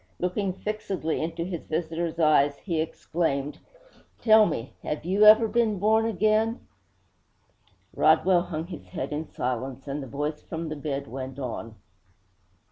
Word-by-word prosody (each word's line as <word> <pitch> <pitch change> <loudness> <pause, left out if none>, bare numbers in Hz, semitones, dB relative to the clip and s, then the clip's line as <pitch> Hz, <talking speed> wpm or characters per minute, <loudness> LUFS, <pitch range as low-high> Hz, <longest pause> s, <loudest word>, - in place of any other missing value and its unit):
Looking 185 +2 -1
fixedly 195 -5 -3
into 165 +1 -3
his 175 -3 -6
visitor's 165 +1 -2
eyes, 145 -3 +4
he 165 -2 -2
exclaimed: 155 -3 -2 0.6
'Tell 220 -2 +6
me, 130 -6 -4
have 150 +1 -4
you 190 +3 0 0.3
been 230 -3 +2
born 220 +3 +3
again?' 215 +2 +1 1.3
Rodwell 185 -2 +4
hung 165 -3 -4
his 170 -3 -9
head - - -4
in 155 +1 -3
silence, 130 +2 -4
and 140 +1 -3
the 135 - -7
voice 150 +3 -3
from 165 0 -5
the 155 - -4
bed 140 -1 -4
went 130 +1 -6
on. 115 -4 -5
160 Hz, 135 wpm, -26 LUFS, 140-190 Hz, 1.3 s, Tell